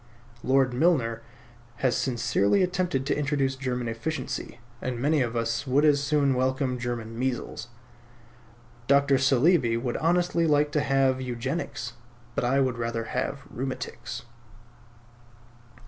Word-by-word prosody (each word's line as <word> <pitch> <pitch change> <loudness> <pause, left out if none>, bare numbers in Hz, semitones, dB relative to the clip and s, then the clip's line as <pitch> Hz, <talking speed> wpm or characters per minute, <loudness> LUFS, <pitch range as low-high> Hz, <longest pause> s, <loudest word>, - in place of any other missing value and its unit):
Lord 130 -1 +3
Milner 125 -6 +2 0.5
has 130 0 +1
sincerely 120 - +2
attempted 180 -7 0
to - - +1
introduce 140 -2 0
German 125 -2 -3
efficiency; 120 +1 -4 0.2
and 125 -2 -3
many 145 +3 +2
of 120 -2 -1
us 115 +2 -1
would 140 +4 +3
as 145 -2 +4
soon 140 -1 +2
welcome 130 0 0
German 120 -2 -4
measles. 125 -2 -3 1.2
Dr. 140 -1 +4
Saleeby 135 -2 +3
would 120 0 -2
honestly 170 0 +2
like 150 -1 +3
to 150 - +1
have 135 -2 +2
Eugenics; 125 -1 -4 0.4
but - - -1
I 130 +3 +2
would 130 -3 0
rather 115 -1 -2
have 130 +4 -3
rheumatics. 125 -1 -5
130 Hz, 125 wpm, -27 LUFS, 120-145 Hz, 1.2 s, as